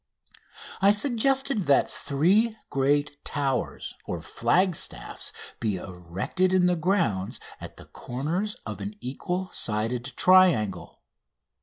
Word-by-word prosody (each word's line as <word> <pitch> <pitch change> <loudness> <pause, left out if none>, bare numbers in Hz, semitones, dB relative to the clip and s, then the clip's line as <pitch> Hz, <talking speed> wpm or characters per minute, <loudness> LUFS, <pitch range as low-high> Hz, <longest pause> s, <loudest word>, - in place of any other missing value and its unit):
I 195 - +6
suggested 255 - +3
that 140 - +4
three 200 +11 +1
great 145 +1 0
towers 135 -3 -2
or 85 - -3
flagstaffs 160 - -1 0.3
be 110 -4 -1
erected 95 - -2
in 185 -1 +4
the 180 0 +3
grounds 160 - 0 0.2
at - - -10
the - - -12
corners 165 - -3
of - - -6
an 205 +1 -5
equal 180 +8 -4
sided 115 +3 -2
triangle. 175 - +3
150 Hz, 110 wpm, -26 LUFS, 120-190 Hz, 0.3 s, I